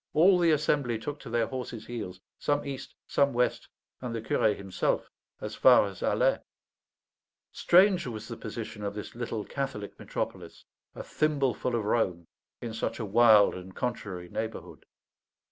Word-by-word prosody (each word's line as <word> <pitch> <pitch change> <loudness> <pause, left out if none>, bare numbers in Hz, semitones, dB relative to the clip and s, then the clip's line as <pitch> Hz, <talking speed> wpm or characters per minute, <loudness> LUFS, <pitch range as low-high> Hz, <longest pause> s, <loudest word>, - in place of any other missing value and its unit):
all 180 +4 +6
the 170 -1 +4
assembly 145 -5 +1
took 145 +6 -6
to 130 - -10
their 115 0 +1
horses' 125 -4 -6
heels, 100 -7 -6 0.2
some 145 0 0
east, 135 -2 -6
some 140 0 +2
west, 125 +1 0 0.3
and 125 -2 -4
the 115 - -3
curé 105 -1 +2
himself 95 -2 -1 0.3
as - - -5
far - - +6
as - - -8
Alais. - - +2 1.1
Strange 185 -2 +4
was 110 -3 -6
the - - -6
position 105 - -7
of 100 0 -3
this 105 - -7
little 115 -3 -4
Catholic 135 -7 -5
metropolis, - - -5 0.3
a - - -6
thimbleful 135 -5 0
of 110 -3 -1
Rome, 90 -6 0 0.4
in 115 -2 -5
such 115 - -2
a 115 - -2
wild 110 0 +6
and 90 +1 -9
contrary 100 -7 -4
neighbourhood. 110 +5 -6
120 Hz, 155 wpm, -29 LUFS, 105-140 Hz, 1.1 s, all